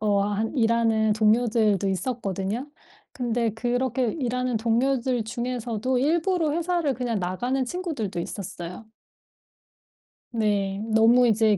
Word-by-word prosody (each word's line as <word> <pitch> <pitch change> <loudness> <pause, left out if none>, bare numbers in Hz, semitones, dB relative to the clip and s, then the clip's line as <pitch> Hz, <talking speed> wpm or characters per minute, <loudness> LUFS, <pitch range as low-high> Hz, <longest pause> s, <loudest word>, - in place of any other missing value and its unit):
어 205 -2 +2
하 205 +1 0
일하는 225 -3 +2
동료들도 215 -2 +2
있었거든요. 200 - -3 0.4
근데 235 -2 -1
그렇게 245 +1 0
일하는 250 -3 -1
동료들 240 +1 +1
중에서도 240 +1 -2
일부러 325 +4 +1
회사를 335 -3 0
그냥 240 -4 -2
나가는 245 +9 -1
친구들도 280 - -4
있었어요. 180 +2 -7 1.5
네. 200 -3 0
너무 235 +3 +6
이제 215 -2 +3
230 Hz, 275 characters per minute, -25 LUFS, 210-255 Hz, 1.5 s, 너무